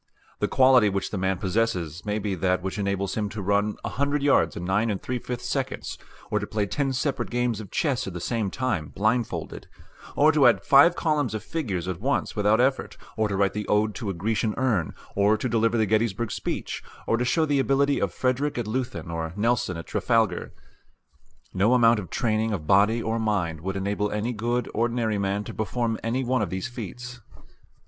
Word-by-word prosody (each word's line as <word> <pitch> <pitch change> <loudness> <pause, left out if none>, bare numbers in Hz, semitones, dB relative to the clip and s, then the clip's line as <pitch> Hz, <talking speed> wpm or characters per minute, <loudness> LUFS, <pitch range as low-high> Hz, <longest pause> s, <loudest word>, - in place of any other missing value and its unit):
The - - +1
quality 130 -4 +5
which 100 -1 -2
the 100 - -2
man 95 0 0
possesses 90 -5 -1
may 105 0 0
be 105 -2 -2
that 90 0 0
which 95 +2 -3
enables 100 -1 -1
him 105 -2 -2
to 110 - -7
run 100 +2 +1
a - - -2
hundred 140 +1 -1
yards 85 - +3
in 90 - -5
nine 105 +5 +1
and 100 -3 -1
three 125 0 -3
fifths 125 0 -5
seconds, - - -3 0.3
or - - +2
to - - -5
play 105 -1 -1
ten 135 +6 -1
separate 135 +2 -1
games 120 -2 0
of 105 -4 -8
chess 140 -10 0
at 95 - -5
the 90 - -5
same 110 +3 -1
time 100 - -2
blindfolded, 110 +6 -2 0.5
or 150 +2 +5
to 145 -4 +5
add 115 -5 +3
five 145 +5 +6
columns 145 - 0
of 110 - -4
figures 100 - -3
at 90 -2 -3
once 140 +4 -1
without 105 +1 +3
effort, 130 +1 +1 0.2
or 110 -1 +1
to 100 - -2
write 100 -1 +2
the 105 0 -4
"Ode 105 +1 +2
to 110 -2 -4
a - - -1
Grecian 110 +4 -1
Urn," 115 -10 0 0.2
or 100 +2 +3
to 130 - -2
deliver 115 0 +2
the 110 - +3
Gettysburg 110 +1 0
speech, - - -4 0.2
or - - +2
to 120 - 0
show 155 +6 +2
the 145 -2 +1
ability 140 +1 +2
of - - 0
Frederick 130 +3 -1
at 120 - -1
Leuthen 120 -5 -3
or 80 0 -4
Nelson 105 -4 0
at 85 - -7
Trafalgar. 115 -6 0 1.0
No 105 +7 +3
amount 115 -2 +5
of 90 -5 -7
training 110 -1 0
of 80 -7 -4
body 105 +7 +4
or 115 +1 -1
mind 90 -8 -1
would 95 +3 -3
enable 100 +1 -1
any 105 +4 -2
good 120 +3 -1
ordinary 115 -2 0
man 100 +1 -1
to - - -8
perform 115 +1 -2
any 120 +4 -1
one 130 -1 +1
of 100 - -1
these 95 +5 -3
feats. 120 +1 -8
110 Hz, 205 wpm, -25 LUFS, 100-125 Hz, 1.0 s, five